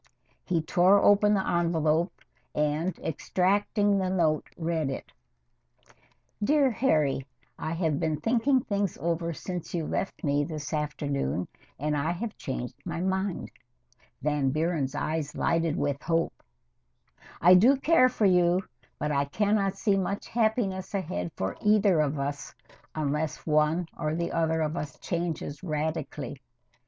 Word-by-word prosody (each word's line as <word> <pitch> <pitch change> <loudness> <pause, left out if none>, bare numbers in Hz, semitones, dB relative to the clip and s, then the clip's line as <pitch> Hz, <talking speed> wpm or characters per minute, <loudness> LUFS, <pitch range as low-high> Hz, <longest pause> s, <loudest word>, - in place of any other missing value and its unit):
He 170 -4 0
tore 180 +5 +5
open 205 +1 +5
the 190 - -1
envelope 170 0 +1 0.4
and, 150 +4 0
extracting 200 +5 +1
the 185 -1 0
note, 165 -5 +1
read 160 -3 -1
it: 135 - -6 1.3
Dear 280 +2 +4
Harry 150 - +1 0.3
I 160 - -3
have 160 -4 0
been 155 -2 -1
thinking 245 - +2
things 200 -3 -1
over 170 0 -1
since 175 +2 -5
you 165 -2 -1
left 195 - -3
me 145 -1 +2
this 155 +1 -5
afternoon 145 - -2 0.3
and 150 +2 -1
I 150 +4 0
have 215 +5 -5
changed 125 -2 -5
my 170 -1 -4
mind. 190 +1 -2 0.7
[Van 145 -2 +1
Buren's 155 -2 -1
eyes 155 -1 -2
lighted 165 -2 +1
with 145 0 -1
hope.] 165 +1 0 1.1
I 180 +3 +7
do 230 +10 +7
care 275 -2 +4
for 230 -4 0
you, 180 0 +4 0.3
but 150 +1 -2
I 140 -1 +1
can 205 +8 0
not 195 -2 +1
see 200 -3 +2
much 195 +1 -2
happiness 215 -4 0
ahead 90 - -3
for 95 +1 -3
either 210 -5 +4
of 150 -1 +1
us 140 0 -4 0.4
unless 150 0 -2
one 155 +3 +2
or 155 -1 -2
the 170 0 -2
other 160 -1 +1
of 155 +1 -1
us 150 -4 -5
changes 165 -4 -3
radically. 150 -4 -3
165 Hz, 140 wpm, -28 LUFS, 150-190 Hz, 1.3 s, I